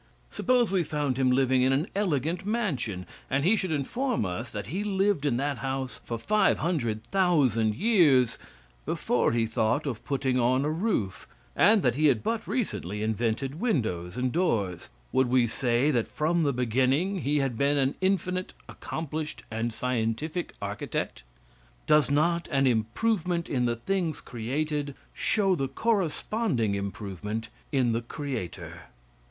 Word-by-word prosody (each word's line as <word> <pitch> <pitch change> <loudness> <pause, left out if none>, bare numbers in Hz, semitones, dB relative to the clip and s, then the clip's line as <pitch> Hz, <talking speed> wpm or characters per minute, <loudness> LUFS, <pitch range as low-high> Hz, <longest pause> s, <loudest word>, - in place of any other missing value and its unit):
Suppose 245 -4 +2
we 190 -3 +2
found 145 -4 -1
him 130 -1 +3
living 130 0 +3
in 130 +1 +4
an 140 +5 +1
elegant 170 -3 0
mansion, 165 - -2 0.2
and 135 +1 +1
he 200 +5 +5
should 190 -3 -2
inform 235 - -1
us 100 +7 -4
that 105 -2 -5
he 185 +9 -3
lived 195 -6 +1
in 120 -4 +1
that 140 -1 -1
house 130 0 -3
for 115 - -4
five 210 - +2
hundred 120 -11 -1
thousand 135 - +3
years 145 - +4 0.4
before - - +1
he 115 -1 +1
thought 115 +6 0
of 125 -6 -4
putting 135 -2 0
on 130 +3 +2
a 150 - +1
roof, 160 - -1 0.3
and 205 +2 +5
that 125 - +3
he 150 +4 +3
had 120 -7 +2
but 230 -1 -2
recently 105 - -2
invented 115 +6 -1
windows 110 - -1
and 125 0 0
doors; 105 - 0 0.2
would 130 -1 +3
we 125 0 +4
say 120 +4 +1
that 120 -5 +1
from 165 +3 0
the 145 -3 +2
beginning 130 - +1
he 145 0 0
had 135 -4 0
been 140 +4 +2
an 135 0 +2
infinite 185 -1 0
accomplished 155 -1 -5
and 115 +2 -1
scientific 125 +8 -2
architect. - - -3 0.6
Does 150 -1 +4
not 170 +4 +2
an 135 -1 +3
improvement 170 - 0
in 125 -3 0
the 120 -1 +1
things 170 +5 -1
created, 140 +4 -3 0.2
show 195 -3 +2
the 135 -6 0
corresponding 180 - 0
improvement 100 +2 -4 0.2
in 130 -4 +2
the 115 +1 0
creator? 125 - -6
135 Hz, 150 wpm, -27 LUFS, 120-175 Hz, 0.6 s, he